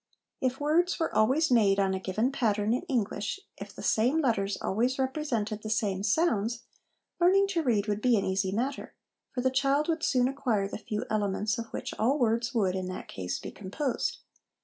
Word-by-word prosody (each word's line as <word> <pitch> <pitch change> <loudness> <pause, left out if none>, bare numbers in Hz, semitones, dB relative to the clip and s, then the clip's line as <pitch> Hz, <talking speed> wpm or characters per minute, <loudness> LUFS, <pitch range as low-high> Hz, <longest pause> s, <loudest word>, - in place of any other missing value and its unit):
If 260 0 0
words 330 +5 +2
were 325 - -1
always 265 +8 +3
made 205 -5 +4
on 195 -1 +2
a 190 - -1
given 215 +7 0
pattern 215 -4 +1
in 250 - 0
English, 225 - -1 0.2
if - - -8
the - - -10
same 250 +8 +2
letters 210 -8 0
always 245 +6 0
represented 260 -6 -2
the 215 - -6
same 205 -3 0
sounds, 230 - +1 0.6
learning 380 +3 +5
to 350 -4 0
read 225 -8 +1
would 210 0 -1
be 245 -1 +4
an 200 - 0
easy 190 0 0
matter; 255 +7 -3 0.4
for 250 - -2
the 260 +1 +2
child 275 +2 +2
would 325 -1 0
soon 250 -5 +2
acquire 255 -7 0
the 205 - -6
few 210 0 -4
elements 210 0 0
of 230 - -5
which - - -5
all 255 +7 +3
words 235 -2 +1
would, 200 -6 +1
in 185 -1 -3
that 185 - -7
case, 90 -1 -4
be - - -7
composed. 230 +7 -3
230 Hz, 195 wpm, -29 LUFS, 205-270 Hz, 0.6 s, learning